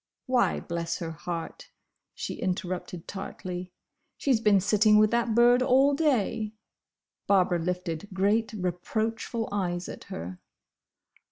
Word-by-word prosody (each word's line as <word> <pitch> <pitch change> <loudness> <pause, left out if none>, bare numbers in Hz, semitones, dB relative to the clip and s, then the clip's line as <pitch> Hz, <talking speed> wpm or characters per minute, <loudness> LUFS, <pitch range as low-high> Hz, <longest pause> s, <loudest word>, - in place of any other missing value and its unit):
"Why, 255 -1 +2
bless 170 -1 -3
her 165 -2 -4
heart!" 165 +1 -6 0.5
she - - -4
interrupted 180 -2 -4
tartly, 185 -2 -6 0.5
"she 275 - +2
's 225 - +2
been 210 -3 +4
sitting 210 +2 +4
with 215 0 +5
that 235 -1 +1
bird 240 +1 +6
all 265 +2 +4
day!" 230 -7 +1 0.7
Barbara 180 -3 +3
lifted 180 +1 -3
great 205 +4 +1
reproachful 220 +4 -2
eyes 180 -3 -2
at - - -8
her. 90 +3 -7
200 Hz, 120 wpm, -28 LUFS, 180-225 Hz, 0.7 s, bird